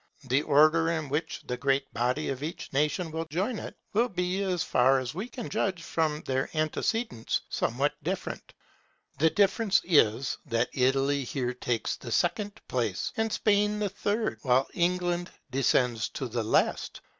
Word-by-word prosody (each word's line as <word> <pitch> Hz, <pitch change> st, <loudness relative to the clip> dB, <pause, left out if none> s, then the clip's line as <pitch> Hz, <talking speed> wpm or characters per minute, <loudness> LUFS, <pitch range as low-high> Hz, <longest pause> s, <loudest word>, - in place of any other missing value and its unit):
The 130 Hz, +2 st, +2 dB
order 155 Hz, +2 st, +4 dB
in 160 Hz, -4 st, -2 dB
which 150 Hz, +3 st, -2 dB
the 125 Hz, -, -3 dB
great 135 Hz, 0 st, 0 dB
body 125 Hz, +6 st, 0 dB
of 135 Hz, -1 st, -3 dB
each 155 Hz, 0 st, -6 dB
nation 150 Hz, +4 st, 0 dB
will 165 Hz, +1 st, -3 dB
join 190 Hz, +9 st, -2 dB
it, -, -, -7 dB, 0.2 s
will 235 Hz, +4 st, +3 dB
be, 180 Hz, +1 st, -1 dB
as 180 Hz, -4 st, 0 dB
far 130 Hz, 0 st, +4 dB
as 130 Hz, -1 st, -3 dB
we 195 Hz, +8 st, -4 dB
can 240 Hz, -3 st, -6 dB
judge 185 Hz, -4 st, -1 dB
from 155 Hz, -2 st, -1 dB
their 130 Hz, 0 st, -1 dB
antecedents, 155 Hz, -, -1 dB
somewhat -, -, 0 dB
different. -, -, -4 dB, 0.7 s
The 160 Hz, +2 st, +5 dB
difference 200 Hz, +2 st, +3 dB
is, 130 Hz, -, +3 dB
that 115 Hz, +1 st, +1 dB
Italy 135 Hz, +2 st, +2 dB
here 125 Hz, -1 st, -2 dB
takes 120 Hz, -2 st, -2 dB
the 120 Hz, -, -8 dB
second 205 Hz, -, 0 dB
place, 115 Hz, -7 st, -1 dB
and 220 Hz, 0 st, 0 dB
Spain 210 Hz, 0 st, +2 dB
the 210 Hz, -1 st, -1 dB
third, 205 Hz, +3 st, -1 dB
while 130 Hz, 0 st, +3 dB
England 175 Hz, 0 st, 0 dB, 0.2 s
descends 125 Hz, -3 st, +2 dB
to 130 Hz, -, -3 dB
the 120 Hz, 0 st, -2 dB
last. 110 Hz, -, +1 dB
155 Hz, 160 wpm, -28 LUFS, 130-185 Hz, 0.7 s, The